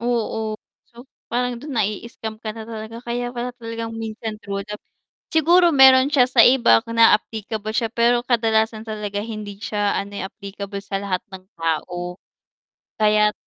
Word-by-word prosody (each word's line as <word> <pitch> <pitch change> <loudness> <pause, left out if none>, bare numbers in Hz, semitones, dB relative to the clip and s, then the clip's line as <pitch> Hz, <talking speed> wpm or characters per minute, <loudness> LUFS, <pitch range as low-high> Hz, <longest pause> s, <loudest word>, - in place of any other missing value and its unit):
Oo, 220 -2 -2 0.3
so 240 +3 -14 0.2
parang 245 0 0
do'n 285 +4 -8
nai-scam 220 0 -3
ka 215 -1 -6
na 225 0 -9
talaga 225 +1 -7
kaya 245 0 -3
pala 245 0 -3
talagang 230 -1 -6
minsan 220 -1 -5
true 200 0 -3
love 210 +1 -8 0.5
siguro 340 +2 +5
mayro'n 265 0 +7
siya 255 -3 +5
sa 245 -3 +6
iba 250 -2 +5
ka 230 - -7
na 230 0 +7
applicable 215 0 -6
siya, 225 +1 0
pero 240 +1 +3
kadalasan 225 -2 +1
talaga 210 -2 -4
hindi 215 -3 -7
siya 205 -1 -1
ano, 200 +1 -4
eh, - - -3
applicable 200 -1 -7
sa 195 0 -3
lahat 190 -2 -2
ng 185 -1 -9
tao. 175 +2 -3 0.8
Kaya't 210 0 +4
220 Hz, 160 wpm, -22 LUFS, 210-240 Hz, 0.8 s, mayro'n